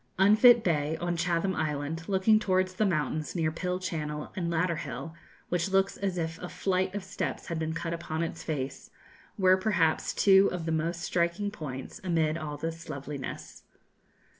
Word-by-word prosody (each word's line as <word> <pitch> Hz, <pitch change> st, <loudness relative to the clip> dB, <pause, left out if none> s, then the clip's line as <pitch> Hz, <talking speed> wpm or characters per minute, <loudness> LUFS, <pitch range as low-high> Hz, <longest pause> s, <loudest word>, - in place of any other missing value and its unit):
Unfit 215 Hz, +5 st, +7 dB
Bay, 155 Hz, -2 st, +1 dB
on 175 Hz, +1 st, -1 dB
Chatham 175 Hz, +2 st, 0 dB
Island, 155 Hz, +2 st, -3 dB
looking 200 Hz, +3 st, +4 dB
towards 185 Hz, -2 st, +1 dB
the 210 Hz, +3 st, +1 dB
mountains 155 Hz, -2 st, -1 dB
near 160 Hz, -2 st, +1 dB
Pill 180 Hz, +2 st, -2 dB
Channel, 150 Hz, -5 st, -4 dB
and 175 Hz, -3 st, -2 dB
Ladder 170 Hz, 0 st, +1 dB
Hill, 140 Hz, +1 st, -6 dB, 0.4 s
which 175 Hz, +1 st, 0 dB
looks 195 Hz, 0 st, +2 dB
as 195 Hz, -2 st, -2 dB
if 165 Hz, -1 st, -3 dB
a 180 Hz, -, -6 dB
flight 185 Hz, 0 st, -1 dB
of 205 Hz, -, -3 dB
steps 190 Hz, +1 st, -4 dB
had 165 Hz, -1 st, -2 dB
been 160 Hz, 0 st, -2 dB
cut 165 Hz, 0 st, -3 dB
upon 165 Hz, -1 st, -3 dB
its 165 Hz, -, -4 dB
face, 140 Hz, -4 st, -4 dB, 0.5 s
were 185 Hz, -2 st, +5 dB
perhaps 175 Hz, -6 st, +1 dB
two 195 Hz, 0 st, +6 dB
of 175 Hz, -2 st, -4 dB
the 165 Hz, -, -1 dB
most 165 Hz, +2 st, -1 dB
striking 170 Hz, +4 st, 0 dB
points 140 Hz, -9 st, -7 dB
amid 165 Hz, -4 st, +1 dB
all 155 Hz, -3 st, -5 dB
this 165 Hz, +2 st, -5 dB
loveliness. 140 Hz, -1 st, -6 dB
170 Hz, 170 wpm, -29 LUFS, 155-185 Hz, 0.5 s, Unfit